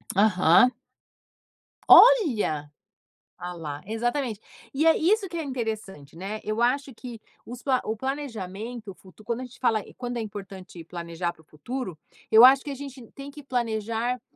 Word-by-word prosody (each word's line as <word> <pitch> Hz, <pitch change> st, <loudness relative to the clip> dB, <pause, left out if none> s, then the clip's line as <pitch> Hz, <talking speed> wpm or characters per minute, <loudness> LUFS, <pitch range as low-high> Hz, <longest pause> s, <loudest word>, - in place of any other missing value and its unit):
Aham. 200 Hz, +3 st, +5 dB, 1.2 s
Olha! 230 Hz, -, +6 dB, 0.7 s
Olha 180 Hz, 0 st, -6 dB
lá! 150 Hz, -3 st, -7 dB
Exatamente. 235 Hz, +1 st, -2 dB, 0.3 s
E 305 Hz, +4 st, +1 dB
é 325 Hz, -, +6 dB
isso 390 Hz, +5 st, +2 dB
que 345 Hz, -, -9 dB
é 325 Hz, -, -2 dB
interessante, 220 Hz, -, -5 dB
né, 195 Hz, +5 st, -5 dB
eu 215 Hz, +2 st, -2 dB
acho 265 Hz, +2 st, +1 dB
que 240 Hz, -1 st, -9 dB, 0.3 s
os 245 Hz, +1 st, -9 dB
pla 260 Hz, -2 st, +1 dB
o 220 Hz, -, -3 dB
planejamento, 230 Hz, -4 st, -5 dB
o -, -, -11 dB
futuro 190 Hz, +3 st, -18 dB
quando 235 Hz, +1 st, -3 dB
a -, -, -5 dB
gente 250 Hz, 0 st, -12 dB
fala 225 Hz, -5 st, +1 dB
quando 245 Hz, -1 st, -4 dB
é -, -, -2 dB
importante 195 Hz, -4 st, -9 dB
planejar 170 Hz, 0 st, -4 dB
para -, -, -22 dB
o 160 Hz, -, -28 dB
futuro, 185 Hz, -, -6 dB, 0.3 s
eu 225 Hz, +3 st, +9 dB
acho 265 Hz, +1 st, +6 dB
que -, -, -7 dB
a -, -, -5 dB
gente 270 Hz, -2 st, -9 dB
tem 275 Hz, +1 st, -9 dB
que 295 Hz, 0 st, -12 dB
planejar, 230 Hz, -1 st, -2 dB
230 Hz, 165 wpm, -25 LUFS, 195-260 Hz, 1.2 s, eu